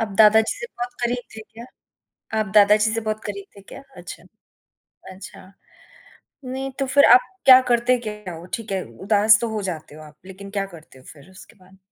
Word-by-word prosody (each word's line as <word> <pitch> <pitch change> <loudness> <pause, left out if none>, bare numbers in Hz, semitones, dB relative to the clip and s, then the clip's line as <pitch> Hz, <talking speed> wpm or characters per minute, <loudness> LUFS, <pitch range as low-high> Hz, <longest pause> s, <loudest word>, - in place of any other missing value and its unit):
आप 225 - -2
दादा 220 0 +6
जी 220 - -3
से 475 - -6
बहुत 245 0 -5
करीब 245 +1 -2
थे - - -8
क्या? 225 +2 -14 0.8
आप 215 - 0
दादा 210 0 +6
जी 220 +1 0
से 230 - -2
बहुत 215 0 -4
करीब 200 -1 -6
थे - - -13
क्या? 200 - -13 0.2
अच्छा, - - -11 0.9
अच्छा। 185 0 -14 0.9
नहीं, 265 +1 -5
तो 270 - 0
फ़िर 280 +2 +4
आप 250 - +6 0.3
क्या 260 -1 +9
करते 240 +1 +2
क्या 210 -4 -7
हो? 165 - -11
ठीक 225 -3 -6
है 190 -1 -3
उदास 210 +2 +2
तो 235 - -3
हो 210 - -3
जाते 165 -6 -7
हो 155 - -12
आप 150 -1 -16
लेकिन 195 +1 -11
क्या 200 -1 -3
करते 155 -4 -18
हो 130 - -20
फ़िर 150 +4 -18
उसके 185 +1 -17
बाद? 190 0 -22
210 Hz, 205 wpm, -21 LUFS, 190-235 Hz, 0.9 s, क्या